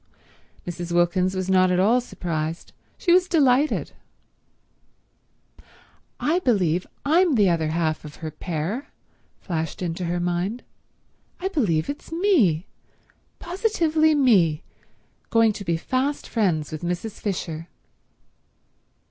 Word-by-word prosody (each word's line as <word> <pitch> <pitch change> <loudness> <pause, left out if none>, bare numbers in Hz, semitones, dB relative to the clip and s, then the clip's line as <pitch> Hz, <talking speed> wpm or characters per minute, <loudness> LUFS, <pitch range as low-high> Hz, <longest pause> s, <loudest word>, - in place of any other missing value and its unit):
Mrs. 175 0 -5
Wilkins 180 +2 +2
was 185 -1 -2
not 185 -1 +4
at 180 0 +2
all 230 +6 +4
surprised; 165 -7 -4 0.2
she 345 - +2
was 365 0 +4
delighted. 285 -3 +2 2.3
"I 330 +4 +1
believe 185 - +1 0.2
I'm 330 +1 +4
the 200 -5 +4
other 165 -2 0
half 155 -1 -1
of 150 -1 -10
her 160 -1 -6
pair," 175 - -4 0.5
flashed 160 -4 -4
into 175 0 -3
her 175 +1 -1
mind. 175 +7 -2 0.8
"I 380 +2 -2
believe 185 - 0
it's 285 - -7
me, 310 - +2 0.7
positively 330 -5 +1
me, 190 - +3 0.7
going 225 -1 +4
to 200 - -7
be 170 -3 0
fast 260 - -2
friends 175 -10 0
with 155 - -5
Mrs. 180 +5 -4
Fisher!" 165 -5 -4
185 Hz, 115 wpm, -24 LUFS, 170-275 Hz, 2.3 s, not